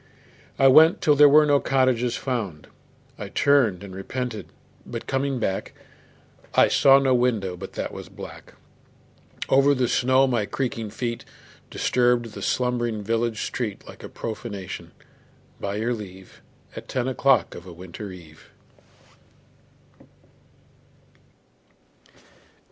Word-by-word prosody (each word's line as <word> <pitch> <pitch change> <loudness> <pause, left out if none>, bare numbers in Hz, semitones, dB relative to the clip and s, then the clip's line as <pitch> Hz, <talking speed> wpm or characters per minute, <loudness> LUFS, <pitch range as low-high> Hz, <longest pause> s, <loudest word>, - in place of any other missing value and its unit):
I 135 - +5
went 155 +5 +7
till 150 - +3
there 145 0 +7
were 150 +2 +6
no 145 -1 +4
cottages 130 -3 +1
found. 105 - -4 0.5
I 100 -2 -6
turned 120 -8 +2
and 100 -2 -9
repented, 120 +3 -5 0.4
but - - -7
coming 135 0 -1
back 95 -5 -3 0.8
I - - +5
saw 135 0 +6
no 135 -1 +2
window 115 -7 0
but 95 +2 -9
that - - -4
was - - -9
black. - - -11 0.9
Over 140 +1 +4
the 125 -2 +1
snow 130 +3 +3
my 120 -6 0
creaking 115 -4 -3
feet 115 +2 -4 0.5
Disturbed 120 -2 +1
the - - -8
slumbering 120 -4 -1
village 115 +1 -1
street 110 -5 -4
Like - - -12
profanation, 105 -4 -6 0.7
by 100 0 -3
your 115 +3 -1
leave, 95 -4 -10 0.3
At - - -9
ten 130 -1 -2
o'clock 130 -6 +2
of 85 +1 -11
a - - -9
winter 90 +4 -9
eve. 80 -4 -14
120 Hz, 120 wpm, -24 LUFS, 100-130 Hz, 0.9 s, went